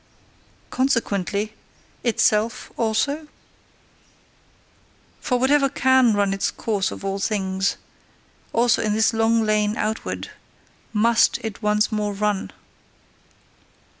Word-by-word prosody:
CONSEQUENTLY 215 -5 0 0.5
itself 225 -1 +1
also? 280 +7 -1 1.9
For 250 - 0
whatever 275 +2 +3
CAN 260 -3 +3
run 200 -1 +1
its 195 - 0
course 205 -4 -2
of - - -8
all 195 0 -2
things, 195 -2 -1 0.7
also 235 0 +2
in 215 -1 0
this 220 +2 +2
long 225 0 +2
lane 215 0 +1
OUTWARD 220 +1 -3 0.6
MUST 230 +1 +3
it 220 -1 -6
once 210 0 +1
more 210 -1 -1
run! 205 -1 -1
215 Hz, 100 wpm, -22 LUFS, 205-235 Hz, 1.9 s, whatever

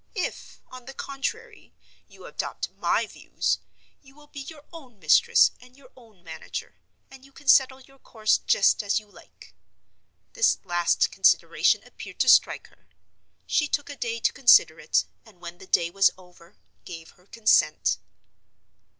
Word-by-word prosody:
If, 370 - -6
on 255 -1 -12
the 270 +1 -11
contrary, 445 - -7 0.3
you - - -16
adopt - - -5
my - - -1
views, - - -3 0.4
you 270 -1 -21
will 300 0 -18
be 290 - -11
your 295 +2 -11
own 265 -9 -13
mistress 155 -5 +4
and 250 +1 -19
your 265 -2 -20
own 220 -8 -21
manager, 160 -2 -8 0.3
and 270 -1 -15
you 275 - -19
can 285 - -18
settle 265 0 +4
your 270 +1 -21
course 215 -4 0
just 195 - +2
as 205 +1 0
you 215 - -19
like." 205 - -19 0.8
This 485 -1 +2
last 175 -2 0
consideration - - +2
appeared - - -12
to - - +3
strike - - +4
her. - - -30 0.6
She 295 - 0
took 290 0 -3
a - - -9
day 230 -3 -4
to - - +1
consider 240 - +5
it; 155 - 0 0.2
and, 210 -5 -21
when 175 0 -10
the 190 - -14
day 170 -2 +1
was 195 +1 +4
over, 180 -1 -20 0.3
gave 165 -2 -11
her 180 +1 -28
consent. 225 0 +1
240 Hz, 160 wpm, -25 LUFS, 180-275 Hz, 0.8 s, consider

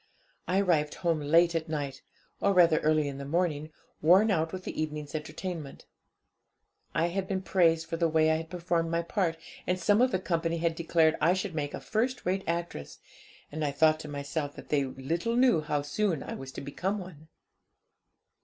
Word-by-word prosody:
I 185 +2 +2
arrived 155 -6 +1
home 170 -3 0
late 165 +4 +4
at 165 -1 -2
night, 140 -3 -3 0.4
or 200 - +2
rather 170 -3 +6
early 155 -1 +2
in 140 -1 -5
the - - -5
morning, 155 0 -1 0.3
worn 190 +7 +5
out 160 -3 +1
with 185 -1 -6
the - - -4
evening's 150 -1 -4
entertainment. 155 -1 -6 1.1
I 170 +1 +2
had 190 +2 -2
been 195 - -1
much 190 - -7
praised 165 -3 +3
for 165 0 -4
the 165 0 +2
way 160 0 +3
I 160 - +2
had 160 0 -7
performed 170 -1 -1
my 170 0 0
part, 170 -2 -1 0.3
and 180 0 0
some 205 +4 +3
of 255 - +5
the 185 - 0
company 170 -2 -1
had 165 0 0
declared 165 -1 +2
I 170 +4 +4
should 190 -1 -3
make 145 -2 -3
a - - -6
first 245 +4 -1
rate 190 +2 0
actress, 170 - -3 0.5
and 155 +1 -3
I 145 - +1
thought 155 +2 +3
to 155 - -8
myself 145 0 -4
that - - -11
they 140 -2 +2
little 150 - -2
knew 245 -11 +4
how 150 -2 -1
soon 165 +1 -1
I - - -6
was 135 0 -7
to - - -6
become 180 +9 -2
one. 175 -5 -10
165 Hz, 200 wpm, -29 LUFS, 150-180 Hz, 1.1 s, rather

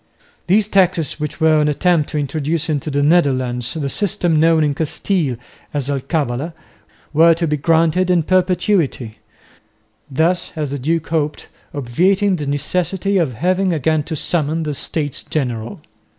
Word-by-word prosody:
These 200 +3 +3
taxes, 180 -7 +1
which 150 0 -4
were 160 -1 +4
an 150 - +2
attempt 155 +1 +1
to 155 - -3
introduce 150 +3 -2
into 150 0 -1
the 145 0 0
Netherlands 130 -6 +1
the 150 -3 -2
system 170 -1 +1
known 160 0 +4
in 145 -1 +1
Castile 155 -1 -1 0.4
as 140 -1 -1
alcabala, 140 +2 -2 0.6
were 165 +2 +6
to 170 +1 -1
be 150 -1 0
granted 165 +4 +2
in 175 -3 +3
perpetuity, 180 - 0 0.9
thus, 165 +6 0
as 150 -3 -3
the 140 - -3
duke 160 +4 -1
hoped, 150 -2 -2 0.2
obviating 180 +9 +1
the 145 -3 -4
necessity 180 +7 -1
of 155 -7 0
having 185 - +1
again 155 0 +1
to 160 - -4
summon 160 +1 -1
the 150 -1 -3
States 145 0 -3
General. 120 -6 -3
155 Hz, 150 wpm, -18 LUFS, 145-175 Hz, 0.9 s, were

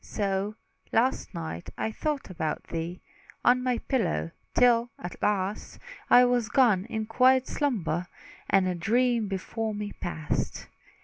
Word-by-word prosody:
So, 200 0 -2 0.4
last 250 +4 +1
night 80 +1 -5
I 220 - -1
thought 290 -2 -3
about 160 -3 -3
thee 170 +2 -5 0.4
On 250 +1 +5
my 250 -1 +1
pillow, 85 - -1 0.2
till, 240 -1 +4
at 175 - -8
last, 200 0 -1 0.3
I 250 0 +8
was 245 -3 +1
gone 215 -8 +4
in 220 -2 -3
quiet 255 +3 +4
slumber; 180 - -1 0.4
And 190 -1 +4
a 180 - 0
dream 230 +5 +1
before 215 +3 -3
me 205 0 -4
passed. 160 -3 -3
215 Hz, 135 wpm, -28 LUFS, 185-245 Hz, 0.4 s, I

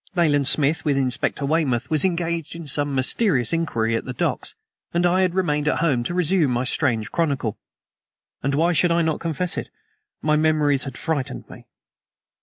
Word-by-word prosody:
Nayland 145 -6 +2
Smith, 155 +3 +2
with 145 -3 +1
Inspector 135 +2 0
Weymouth, 140 -5 0
was 155 -2 +3
engaged 170 -3 -1
in 170 -1 -8
some 145 0 -2
mysterious 130 - +2
inquiry 115 -9 0
at 115 - -2
the 125 - -6
docks, - - -2 0.4
and 175 +1 +2
I 180 +2 +3
had 185 -1 +1
remained 150 -5 0
at - - +2
home 145 -8 +1
to 175 - -2
resume 180 -3 +2
my 120 0 0
strange 120 -5 0
chronicle. 140 -9 -1 0.8
And 140 +1 0
why 170 +4 +2
should 175 +2 +2
I 170 0 +2
not 160 -1 -1
confess 170 +2 -1
it? - - -7 0.5
my 150 0 +1
memories 150 -3 +2
had 135 -3 -7
frightened 150 -5 -3
me. - - -13
150 Hz, 180 wpm, -22 LUFS, 135-170 Hz, 0.8 s, was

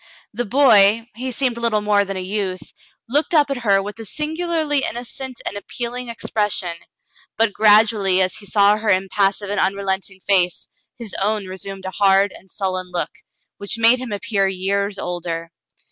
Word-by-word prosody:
The 240 +3 -2
boy 220 -3 +5
— - - -47
he 255 +3 -4
seemed 250 -1 0
little 230 -3 +1
more 205 -1 +3
than 195 -1 -5
a - - -3
youth 185 -1 -4 0.2
— - - -40
looked 295 +7 +1
up 290 -2 +4
at 275 - -1
her 200 -5 +2
with 205 +3 -8
a - - -6
singularly 315 - -1
innocent 245 +2 -5
and - - -3
appealing 240 +4 -5
ex 230 - -6
pression, 200 -5 -1 0.6
but 225 -1 +2
gradually 210 -3 +4
as 185 -1 +1
he 205 - -8
saw 205 +2 +4
her 215 0 -2
impassive 195 +1 +1
and 205 - -1
un 195 +1 +1
relenting 190 -1 -3
face, 180 -3 +1 0.3
his 230 -5 -8
own 210 0 0
resumed 190 +1 -7
a 190 - -4
hard 195 +1 +3
and 190 - -16
sullen 185 -2 -3
look, 175 - -2 0.5
which 200 +2 -1
made 230 +2 +5
him 255 -3 -6
appear 200 -1 0
years 200 +2 -1
older. 170 -2 -4
205 Hz, 180 wpm, -20 LUFS, 190-235 Hz, 0.6 s, boy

